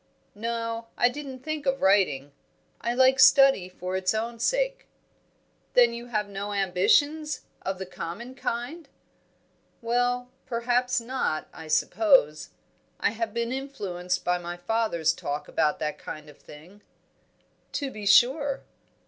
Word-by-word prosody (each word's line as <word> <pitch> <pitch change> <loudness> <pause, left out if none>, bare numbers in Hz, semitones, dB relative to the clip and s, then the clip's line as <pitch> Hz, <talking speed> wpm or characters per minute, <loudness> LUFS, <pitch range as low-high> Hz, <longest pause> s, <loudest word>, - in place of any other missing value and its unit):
"No; 230 +1 -3
I 245 - +4
didn't 270 -1 -8
think 305 0 -4
of 270 0 +1
writing. 165 -8 +3 0.5
I 235 +1 -1
like 260 +1 +5
study 270 -8 +6
for 185 0 -5
its 190 +2 0
own 230 +1 -3
sake." - - 0 0.9
"Then 240 -1 +6
you 235 +1 -7
have 215 -3 -1
no 200 +1 -5
ambitions, 290 - +2 0.2
of 190 0 -3
the 190 - -5
common 185 +8 -7
kind?" 270 +5 -4 0.9
"Well, 245 +1 0 0.2
perhaps 245 +1 +1
not. 235 -10 -2
I 160 - -10
suppose 155 - +3 0.5
I - - +2
have 225 0 -3
been 235 +2 -2
influenced 185 -10 -3
by 180 0 +1
my 175 0 -6
father's 175 -5 0
talk 145 -1 -4
about 150 - +1
that 150 -1 -3
kind 155 -1 -8
of 145 - -22
thing." 175 +8 -15 0.9
"To 280 -2 -2
be 210 -3 -6
sure." 270 +7 +4
230 Hz, 135 wpm, -26 LUFS, 185-260 Hz, 0.9 s, study